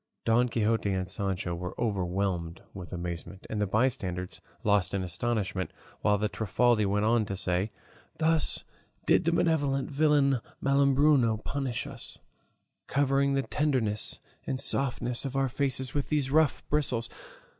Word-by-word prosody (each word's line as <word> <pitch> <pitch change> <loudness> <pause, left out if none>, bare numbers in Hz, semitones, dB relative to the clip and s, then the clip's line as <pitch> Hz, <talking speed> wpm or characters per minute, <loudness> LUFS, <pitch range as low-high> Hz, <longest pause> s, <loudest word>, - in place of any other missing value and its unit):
Don 120 +2 +3
Quixote 110 -2 +1
and 95 -1 -1
Sancho 95 -2 -2
were 90 +1 -6
overwhelmed 95 -4 -1
with 90 -3 -8
amazement, 85 +2 -6
and 105 -1 -1
the 105 - +1
bystanders 95 -5 -1 0.2
lost 100 -2 +2
in 95 - -1
astonishment, 95 +1 -2 0.3
while 105 -1 +3
the 105 +1 0
Trifaldi 110 +1 +2
went 105 +2 +1
on 115 0 +3
to 95 - -4
say: 90 +2 0 0.5
"Thus 160 -1 +1 0.4
did - - +3
that 170 - +3
malevolent 155 -6 +1
villain 140 -2 +3 0.2
Malambruno 140 -3 +4
punish 135 -4 -2
us, - - -9 0.7
covering 140 0 +2
the 135 - +1
tenderness 130 -10 0 0.3
and 130 - -1
softness 125 -3 +1
of 135 -1 -4
our 135 0 +2
faces 130 -1 -1
with 145 -1 -2
these 145 -3 +1
rough 155 -1 +2
bristles! 130 -6 0
115 Hz, 140 wpm, -29 LUFS, 100-140 Hz, 0.7 s, Malambruno